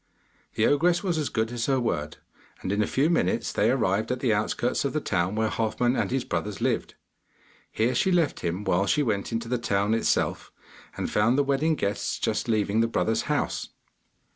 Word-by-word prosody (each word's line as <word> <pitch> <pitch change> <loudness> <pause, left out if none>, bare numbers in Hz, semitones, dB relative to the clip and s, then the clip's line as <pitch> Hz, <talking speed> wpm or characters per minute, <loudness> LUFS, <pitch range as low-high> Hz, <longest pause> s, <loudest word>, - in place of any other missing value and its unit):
The 110 - +2
ogress 170 +5 +3
was 175 -5 0
as 150 - -1
good 110 0 -1
as 120 -1 -2
her 135 -2 +2
word, 75 -11 -2 0.5
and 95 - -2
in 100 +1 +1
a 105 - +1
few 140 +3 +2
minutes 170 0 0
they - - +2
arrived 100 +5 +1
at 125 - -1
the 125 -4 +2
outskirts 110 +4 0
of 140 - -1
the 155 - +1
town 95 - -1
where 110 0 +1
Halfman 115 +3 0
and - - 0
his 130 0 -1
brothers 95 +4 -3
lived. - - -1 0.8
Here 115 +3 +1
she 185 +9 +2
left 170 -4 +1
him, 90 +3 -3
while 100 0 +1
she 150 - +2
went 105 -5 -1
into 115 0 -3
the 125 0 -1
town 105 -2 +1
itself, 115 - 0 0.5
and - - -2
found 115 +5 +2
the 145 - +4
wedding 140 +3 +1
guests 100 -6 -2
just - - -1
leaving 110 -1 +1
the 115 - +3
brother's 110 -1 0
house. - - -1
115 Hz, 200 wpm, -26 LUFS, 105-135 Hz, 0.8 s, the